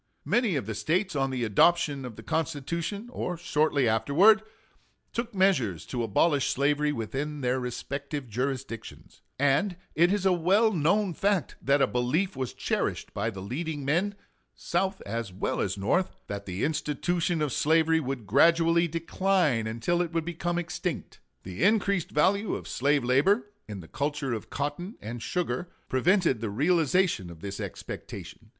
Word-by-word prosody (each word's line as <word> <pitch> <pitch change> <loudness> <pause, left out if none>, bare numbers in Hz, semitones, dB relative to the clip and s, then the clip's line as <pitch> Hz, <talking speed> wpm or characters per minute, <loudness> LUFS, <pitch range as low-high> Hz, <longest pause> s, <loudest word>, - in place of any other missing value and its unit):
Many 235 -7 +2
of 135 - -1
the 110 - -3
States 170 - 0
on 135 -1 +1
the 130 -2 -2
adoption 140 - +3
of 120 -3 -7
the 110 - -11
Constitution, 165 - -2
or 180 -7 -3
shortly 150 -5 +1
afterwards, 165 - +5 0.7
took 235 -2 -3
measures 125 - +2
to 125 - -3
abolish 135 +6 +2
slavery 145 +2 +1
within 145 +5 -4
their 125 0 +1
respective 140 +3 -4
jurisdictions; 125 0 -5 0.2
and 145 +8 +2 0.2
it 170 +3 +4
is 200 -1 0
a 190 - +5
well 195 +6 +3
known 185 +4 +2
fact 195 +1 0
that 140 0 +3
a - - +6
belief 130 +10 0
was 130 -2 -4
cherished - - -2
by 105 +2 -1
the 95 -4 -7
leading 145 - -4
men, 180 +8 +1 0.4
South 190 0 -1
as 115 -1 -4
well 95 - -2
as 95 0 -1
North, 175 - 0
that 100 0 -6
the 95 +2 -3
institution 165 +3 0
of 150 -5 -1
slavery 160 +1 +3
would 135 -6 -4
gradually 165 - +4
decline 165 - +1
until 115 +11 0
it 170 -2 -2
would 165 -1 -1
become 175 0 -2
extinct. 175 0 -4 0.2
The 95 +5 -7
increased 200 -3 +2
value 195 +8 +2
of - - -7
slave 140 +1 +1
labor, 195 - +2 0.2
in 105 -3 -6
the 80 - -12
culture 145 - -2
of 110 - -5
cotton 145 - -4
and 115 +2 -6
sugar, 175 +1 -2 0.2
prevented 165 - +2
the 115 - -2
realization 160 - +2
of 85 -2 -12
this 100 -1 -6
expectation. - - -8
150 Hz, 155 wpm, -28 LUFS, 125-175 Hz, 0.7 s, a